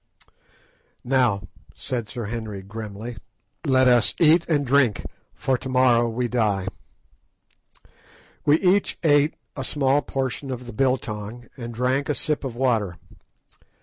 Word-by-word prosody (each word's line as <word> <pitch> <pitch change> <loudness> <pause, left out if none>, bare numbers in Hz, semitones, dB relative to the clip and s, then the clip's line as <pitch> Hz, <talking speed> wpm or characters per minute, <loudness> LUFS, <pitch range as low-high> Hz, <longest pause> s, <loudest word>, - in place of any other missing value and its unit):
"Now," 120 -8 +1 0.3
said 120 -4 -4
Sir 120 -4 -5
Henry 105 -3 -5
grimly, 110 +2 -7 0.5
"let 130 -1 +4
us 120 -1 +4
eat 165 +1 +5
and 145 -3 +2
drink, 130 -4 +2 0.3
for 130 -2 0
to 130 - -6
morrow 125 -2 +4
we 120 +2 -1
die." 105 -6 0 1.8
We 150 +2 +4
each 190 +2 +2
ate 145 -1 +4 0.2
a 135 - -4
small 140 +1 +2
portion 135 0 -3
of 125 -1 -5
the 120 - -8
"biltong," 120 -2 -2
and 120 -3 -7
drank 130 +4 0
a 150 - +1
sip 150 +1 -1
of 130 -4 -4
water. 115 -8 0
125 Hz, 130 wpm, -24 LUFS, 115-135 Hz, 1.8 s, eat